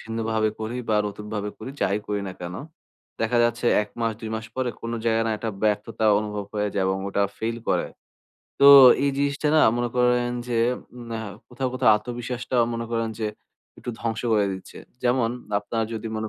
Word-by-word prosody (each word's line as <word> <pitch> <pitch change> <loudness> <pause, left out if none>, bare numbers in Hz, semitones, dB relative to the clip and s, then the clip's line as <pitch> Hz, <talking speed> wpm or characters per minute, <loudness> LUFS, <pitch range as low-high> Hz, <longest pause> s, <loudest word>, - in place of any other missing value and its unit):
ভিন্নভাবে 110 -1 -1
করি 110 +3 -3
বা 110 - +2
নতুন 105 +1 -9
ভাবে 105 0 -2
করি 120 +5 -7
,যাই 100 +2 +2
করি 105 -1 -1
না - - -6
কেনো, 90 +5 -5 0.6
দেখা 115 +2 +2
যাচ্ছে 120 +1 0 0.2
১ 105 - -8
মাস 115 -1 +1
২ 110 - -5
মাস 110 0 -5
পরে, 130 -2 -1
কোনো 115 0 -4
জায়গায় 115 0 +2
না - - 0
একটা 115 - -3
ব্যর্থতা 110 +1 0
অনুভব 105 -1 -4
হয়ে 105 0 0
যায় 95 -1 +1
এবং 95 0 0
ওটা 100 +1 0 0.2
ফেইল 115 +1 -2
করে। - - +1 0.7
তো 140 - +7 0.4
এই 140 - +3
জিনিসটা 140 +1 0
না - - +6 0.2
মনে 120 0 0
করেন 125 0 +3 0.2
যে, 120 - 0 0.4
উম 120 - -9
অ্যা 110 - -3 0.3
কোথাও, 130 -1 -2
কোথাও 125 - +4
আত্মবিশ্বাসটাও 120 +2 -2
মনে 115 0 -3
করেন 115 -1 0
যে 110 - -1 0.5
একটু 120 - -5
ধ্বংস 115 -1 -2
করে 105 -2 +3
দিচ্ছে। 95 0 -9 0.2
যেমন 120 -2 +2 0.3
আপনারা 110 +2 -2
যদি 110 0 -5
মনে 110 0 -3
115 Hz, 190 wpm, -24 LUFS, 105-120 Hz, 0.7 s, তো